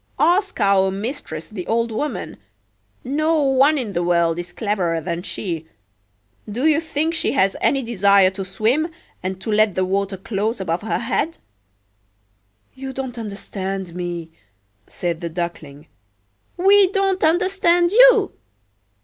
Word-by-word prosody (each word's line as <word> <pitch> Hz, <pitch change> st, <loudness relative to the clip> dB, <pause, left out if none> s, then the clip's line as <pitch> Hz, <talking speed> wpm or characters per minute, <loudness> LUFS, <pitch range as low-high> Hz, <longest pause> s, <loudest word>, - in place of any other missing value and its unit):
Ask 380 Hz, 0 st, +2 dB
our 195 Hz, -2 st, +3 dB
mistress, 195 Hz, -, -5 dB
the 190 Hz, -5 st, -7 dB
old 230 Hz, 0 st, 0 dB
woman; 290 Hz, +7 st, -4 dB, 0.7 s
no 310 Hz, +5 st, +1 dB
one 275 Hz, +3 st, +4 dB
in 230 Hz, -7 st, -3 dB
the 175 Hz, -, 0 dB
world 170 Hz, -1 st, +1 dB
is 175 Hz, 0 st, -6 dB
cleverer 185 Hz, -5 st, -1 dB
than 170 Hz, +1 st, -4 dB
she. 175 Hz, -3 st, -4 dB, 0.8 s
Do 245 Hz, +7 st, -2 dB
you 315 Hz, 0 st, +4 dB
think 320 Hz, 0 st, -1 dB
she 320 Hz, -, +1 dB
has 195 Hz, -8 st, +2 dB
any 275 Hz, -1 st, +2 dB
desire 200 Hz, -4 st, +4 dB
to 195 Hz, 0 st, -5 dB
swim, 225 Hz, -, 0 dB, 0.3 s
and 185 Hz, 0 st, -4 dB
to 205 Hz, +4 st, -4 dB
let 215 Hz, -2 st, +3 dB
the 185 Hz, -, +1 dB
water 195 Hz, +1 st, -1 dB
close 210 Hz, +4 st, -2 dB
above 170 Hz, -2 st, -2 dB
her 220 Hz, -, -1 dB
head?""You 100 Hz, -, -8 dB
don't 260 Hz, -2 st, -5 dB
understand 195 Hz, -3 st, -5 dB
me," 175 Hz, -2 st, -5 dB, 0.6 s
said 170 Hz, -1 st, -4 dB
the 170 Hz, -, -3 dB
Duckling."We 155 Hz, -, -1 dB
don't 390 Hz, -1 st, 0 dB
understand 350 Hz, 0 st, +3 dB
you? 470 Hz, -2 st, +6 dB
200 Hz, 130 wpm, -21 LUFS, 170-275 Hz, 0.8 s, you